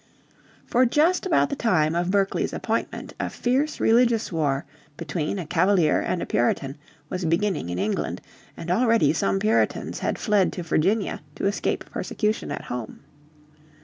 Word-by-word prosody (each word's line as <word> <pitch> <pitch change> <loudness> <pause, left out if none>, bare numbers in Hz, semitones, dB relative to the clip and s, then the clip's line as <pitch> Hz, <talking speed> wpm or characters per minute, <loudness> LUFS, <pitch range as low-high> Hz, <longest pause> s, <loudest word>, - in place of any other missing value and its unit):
For 250 - +3
just 330 +9 +2
about 335 - +2
the - - -1
time 160 - +2
of 175 +1 0
Berkeley's 195 0 0
appointment - - -3
a - - -1
fierce 270 +5 0
religious 230 -1 +3
war 145 -4 0 0.3
between 165 +3 -3
Cavalier 175 0 +3
and 175 - -2
Puritan 135 +3 0 0.3
was 185 +3 -4
beginning 170 - 0
in 90 - -3
England, - - -2 0.4
and 170 - -4
already 225 - +3
some 160 +5 +1
Puritans 215 +3 0
had - - -1
fled 210 -4 +2
to 180 - -5
Virginia 190 +6 0
to - - -3
escape 200 +1 -1
persecution 215 0 -2
at - - -4
home. 120 -3 -6
190 Hz, 145 wpm, -24 LUFS, 155-225 Hz, 0.4 s, For